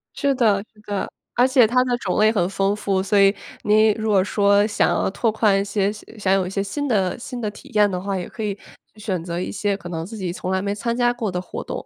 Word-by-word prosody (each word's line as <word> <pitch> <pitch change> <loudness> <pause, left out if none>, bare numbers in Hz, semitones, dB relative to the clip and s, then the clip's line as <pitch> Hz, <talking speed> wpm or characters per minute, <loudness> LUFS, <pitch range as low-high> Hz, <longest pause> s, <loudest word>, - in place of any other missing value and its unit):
是 280 -2 +1
的 210 -6 +3
是 215 - -22
的， 205 -2 -3 0.3
而 245 +2 +4
且 260 -3 +5
它 250 +3 +3
的 245 -1 0
种 195 -3 -2
类 215 +1 +5
很 180 -6 +1
丰 195 +1 0
富。 195 -2 0
所 200 +1 +2
以， 195 0 +6 0.3
您 215 +1 +4
如 220 0 -3
果 195 -3 +4
说 200 0 +3
想 210 - +1
要 - - +1
拓 225 +2 0
宽 210 -2 +2
一 - - 0
些 200 0 0
想 210 -2 -3
有 190 -2 +2
一 - - -4
些 195 0 -2
新 285 +9 -3
的 190 -7 +1
新 245 +1 -7
的 215 -3 -2
体 205 - -13
验 210 -1 +4
的 180 -2 -3
话， 195 +1 -3
也 180 - -4
可 220 - -7
以 205 -1 -2 0.4
选 190 -5 -3
择 170 0 -4
一 180 - -3
些 205 -1 -1
可 175 -3 -9
能 165 -1 -4
自 220 +5 -8
己 180 -4 -3
从 185 0 -4
来 190 0 +1
没 200 0 -2
参 235 +2 -2
加 240 0 +2
过 230 -5 -3
的 180 0 -2
活 185 - -7
动。 - - -6
205 Hz, 290 characters per minute, -22 LUFS, 195-220 Hz, 0.4 s, 以